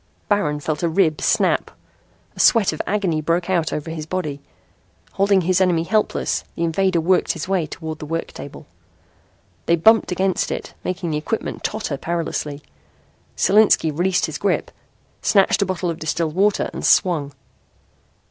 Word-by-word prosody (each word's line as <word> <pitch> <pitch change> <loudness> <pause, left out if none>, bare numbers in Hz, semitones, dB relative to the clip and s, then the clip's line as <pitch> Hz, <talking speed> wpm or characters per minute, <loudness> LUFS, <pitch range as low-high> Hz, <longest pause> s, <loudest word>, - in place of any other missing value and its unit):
Baron 195 -8 +1
felt 150 0 -3
a 170 - +1
rib 160 -3 +1
snap. - - +1 0.7
A - - -13
sweat 220 -8 +4
of 155 - -3
agony 185 -6 0
broke 170 +4 0
out 170 -3 +1
over 155 +2 -4
his 155 -1 -6
body. 155 -6 -3 0.7
Holding 195 -1 +2
his 185 +2 +1
enemy 175 -3 +2
helpless 215 +4 0
the 170 - -2
invader 175 +2 +1
worked 180 +3 +2
his 165 0 -6
way 185 -5 0
toward 160 0 -7
the 150 - -7
work 165 +2 -3
table. 140 - -10 1.0
They 170 - +4
bumped 220 +5 +4
against 185 +1 0
it, - - -5
making 180 -2 -3
the 150 - 0
equipment 215 +9 -4
totter 210 -10 -3
perilously. 150 -3 -3 0.7
Solinski 205 -6 +4
released 180 +2 +1
his - - -6
grip, - - 0 0.5
snatched 195 0 +3
a 200 - +1
bottle 180 -2 -2
of 165 - -7
distilled 160 0 -2
water 200 +3 +1
and - - -6
swung. 150 -6 +2
170 Hz, 155 wpm, -21 LUFS, 160-190 Hz, 1.0 s, sweat